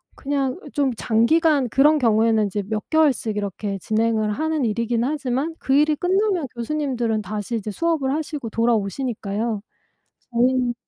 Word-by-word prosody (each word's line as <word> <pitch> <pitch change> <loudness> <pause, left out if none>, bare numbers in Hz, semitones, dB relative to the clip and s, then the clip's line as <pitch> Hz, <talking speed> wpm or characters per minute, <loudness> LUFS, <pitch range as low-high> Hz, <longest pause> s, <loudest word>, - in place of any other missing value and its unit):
그냥 275 -2 -2
어 - - -11
좀 280 -2 +1
장기간 275 +5 +2
그런 295 +6 +4
경우에는 220 -3 +3
이제 200 +1 -3
몇 215 0 -4
개월씩 280 -9 +2
이렇게 200 0 -3
진행을 220 0 0
하는 310 +2 -1
일이긴 230 +1 0
하지만 280 +2 -2
그 265 - -1
일이 300 +2 +4
끝나면 370 -1 +1
교수님들은 240 -3 -1
다시 210 +3 -4
이제 215 -1 -3
수업을 300 - 0
하시고 300 -5 -4
돌아오시니까요. 220 -1 -1 0.7
저희는 245 0 +2
240 Hz, 355 characters per minute, -22 LUFS, 220-290 Hz, 0.7 s, 그런